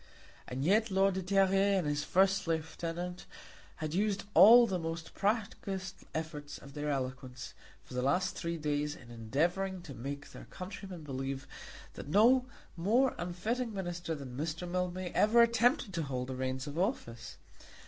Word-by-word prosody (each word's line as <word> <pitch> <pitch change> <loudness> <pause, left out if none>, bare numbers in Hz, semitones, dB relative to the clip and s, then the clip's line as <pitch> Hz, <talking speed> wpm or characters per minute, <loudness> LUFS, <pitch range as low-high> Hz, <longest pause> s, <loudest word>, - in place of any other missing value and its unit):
And 130 +3 -3
yet 215 +5 +3
Lord 195 0 +3
de 190 - -2
Terrier 195 +1 +3
and 180 - 0
his 145 0 0
first 190 +1 +2
lieutenant 165 +2 -3 0.5
had 155 -1 -4
used 200 +1 0
all 235 +3 +9
the 190 -5 -1
most 165 0 -5
practised 195 -3 -2
efforts 155 -2 -5
of 140 - -13
their 150 0 -3
eloquence 130 -1 -4 0.3
for - - -13
the 125 - -1
last 180 +8 +1
three 170 0 -3
days 150 -1 -1
in 120 -1 -14
endeavouring 170 - -1
to 145 - -8
make 140 +4 -6
their - - -10
countrymen 185 -2 -8
believe 135 -1 -4 0.5
that - - -8
no 240 - +5 0.3
more 225 +10 +3
unfitting 215 +7 -2
Minister 175 -3 -3
than 135 -4 -8
Mr. 160 +5 -3
Mildmay 180 0 -2
ever 230 +3 +5
attempted 235 - +2
to 170 - -1
hold 130 -3 -3
the 130 - -3
reins 130 +1 -2
of 145 +2 -5
office! 120 - -3
175 Hz, 160 wpm, -32 LUFS, 145-195 Hz, 0.5 s, all